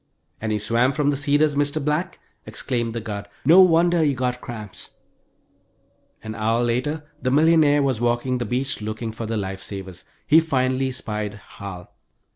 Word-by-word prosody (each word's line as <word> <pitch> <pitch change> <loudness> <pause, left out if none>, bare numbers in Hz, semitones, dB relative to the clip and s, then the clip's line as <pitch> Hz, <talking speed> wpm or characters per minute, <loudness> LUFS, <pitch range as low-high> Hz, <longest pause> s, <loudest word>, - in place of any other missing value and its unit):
"And 110 0 -2
you 105 - 0
swam 115 +5 +1
from 145 -1 +1
the - - -1
Cedars, 145 +1 +2
Mr. 145 +1 0
Black," 160 +5 -1 0.3
exclaimed 120 -3 -3
the 115 - -2
guard. 100 -2 -6 0.2
"No 170 +6 +8
wonder 175 -1 +4
you 145 -3 +2
got 125 -1 -2
cramps." 105 -5 -9 1.3
An 110 - -5
hour 115 +2 0
later 130 +6 -1 0.2
the 130 - 0
millionaire 150 0 +4
was 130 -5 0
walking 120 +1 0
the 120 - -2
beach 125 +2 -2
looking 110 +2 -4
for 110 0 -6
the 115 0 -2
life 95 -1 -4
savers. 95 -2 -7 0.2
He 155 - +6
finally 130 -4 0
spied 105 -4 -4
Hal. 100 -3 -10
125 Hz, 165 wpm, -23 LUFS, 110-145 Hz, 1.3 s, No